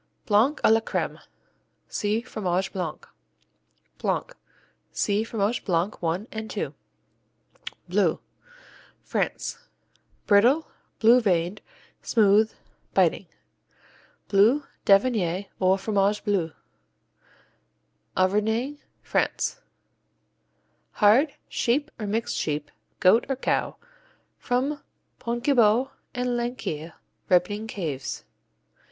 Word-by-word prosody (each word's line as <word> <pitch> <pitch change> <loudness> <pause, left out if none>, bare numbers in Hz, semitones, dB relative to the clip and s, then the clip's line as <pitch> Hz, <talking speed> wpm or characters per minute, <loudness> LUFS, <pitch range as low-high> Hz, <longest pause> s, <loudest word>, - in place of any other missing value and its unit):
Blanc 230 +8 +3
à - - +6
la 225 - +6
crème - - -3 0.7
see 210 +2 -1
Fromage 190 -5 -2
Blanc. 180 -6 -4 1.0
Blanc - - -1 0.6
see 205 +1 0
Fromage 225 0 -1
Blanc 180 +2 0
I 170 +5 -1
and 220 0 -6
II. - - -2 1.1
Bleu - - +2 0.8
France - - -2 0.7
Brittle; 240 +10 +4 0.3
blue 235 +3 +6
veined; 180 -2 0 0.4
smooth; 215 -1 +4 0.4
biting. - - +2 1.0
Bleu 220 +9 +4 0.2
d'Auvergne 195 -3 +3
or 185 0 +3
Fromage 200 0 +1
Bleu 190 -6 0 1.7
Auvergne, 220 +9 +1 0.2
France - - -1 1.3
Hard; 240 +8 +4
sheep 265 +5 0
or 210 - -3
mixed 230 +3 -1
sheep, 150 -1 -2 0.3
goat 195 +6 +5
or 270 - +1
cow; 260 - -1 0.6
from 270 +4 -1 0.4
Pontgibaud 240 0 +2 0.2
and 250 0 -1
Laqueuille 230 -10 -4 0.4
ripening 205 +4 +2
caves. 155 -11 -4
210 Hz, 85 wpm, -25 LUFS, 190-240 Hz, 1.7 s, à